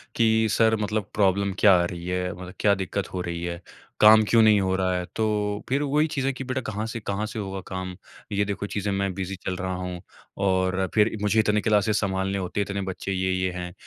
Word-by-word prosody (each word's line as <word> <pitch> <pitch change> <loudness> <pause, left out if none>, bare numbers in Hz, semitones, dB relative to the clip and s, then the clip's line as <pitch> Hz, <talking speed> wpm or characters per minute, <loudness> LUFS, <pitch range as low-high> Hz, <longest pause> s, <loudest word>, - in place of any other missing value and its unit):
कि 110 -1 +3
सर 110 -1 +3
मतलब 105 -1 -2
प्रॉब्लम 100 -1 +2
क्या 100 -3 +7
आ - - +1
रही 85 -1 -6
है? 90 0 -1
मतलब 90 +1 -9
क्या 100 -1 +4
दिक्कत 95 +1 -3
हो 90 - -2
रही 85 -1 -4
है? 85 0 -4 0.4
काम 110 +1 +8
क्यों 115 - +5
नहीं 110 -2 +6
हो 95 0 +1
रहा 95 -1 0
है? 90 - -3
तो 105 -2 -1
फिर 135 +3 +1
वही 150 +2 +2
चीज़ें 135 -1 0
कि 135 - -6
बेटा 130 0 -2
कहाँ 105 +1 -3
से - - -2
कहाँ 105 0 -3
से 110 +1 -6
होगा 95 -2 -4
काम? 95 0 -5 0.4
ये 100 0 +1
देखो 100 0 -3
चीज़ें, 100 0 -2
मैं 100 -1 -1
बिज़ी 95 +1 -4
चल 95 - -1
रहा 95 0 -3
हूँ 90 -1 -5 0.5
और 95 0 +1
फिर 110 +1 +3
मुझे 105 +1 +2
इतने 105 -1 +2
क्लासेस 105 0 +2
संभालने 95 -1 -1
होते 95 +1 -3
हैं, 100 - +1
इतने 100 0 -2
बच्चे 95 +1 -5
ये-ये 95 0 0
हैं। 90 0 -6
100 Hz, 225 wpm, -25 LUFS, 95-105 Hz, 0.5 s, काम